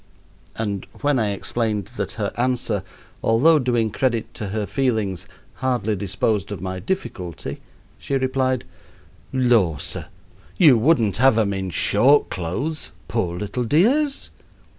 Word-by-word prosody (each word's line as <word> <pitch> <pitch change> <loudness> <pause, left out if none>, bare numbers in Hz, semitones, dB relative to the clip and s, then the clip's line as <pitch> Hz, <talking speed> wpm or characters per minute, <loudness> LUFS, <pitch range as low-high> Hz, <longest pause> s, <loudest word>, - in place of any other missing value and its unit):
And 100 -3 -3
when 145 -3 +2
I 110 -2 +1
explained 105 0 -2
that - - -3
her - - -3
answer, 120 -4 0 0.4
although 150 +8 +5
doing 120 -4 +1
credit 115 -1 -1
to 105 - -5
her 105 +2 -2
feelings, 110 -8 -1 0.3
hardly 120 -5 0
disposed 100 +1 -1
of 100 - -4
my 95 +1 -4
difficulty, 90 - -4 0.4
she 140 - -2
replied: 130 -1 0 0.7
"Lor', 115 - +3
sir, - - -4 0.5
you 155 -8 +7
wouldn't 115 - +3
have 130 -1 +5
'em 105 -3 +2
in 95 -1 -3
short 130 - +3
clothes, 130 - -3 0.2
poor 95 -4 -1
little 105 +6 -3
dears?" 255 - +2
115 Hz, 130 wpm, -22 LUFS, 100-130 Hz, 0.7 s, you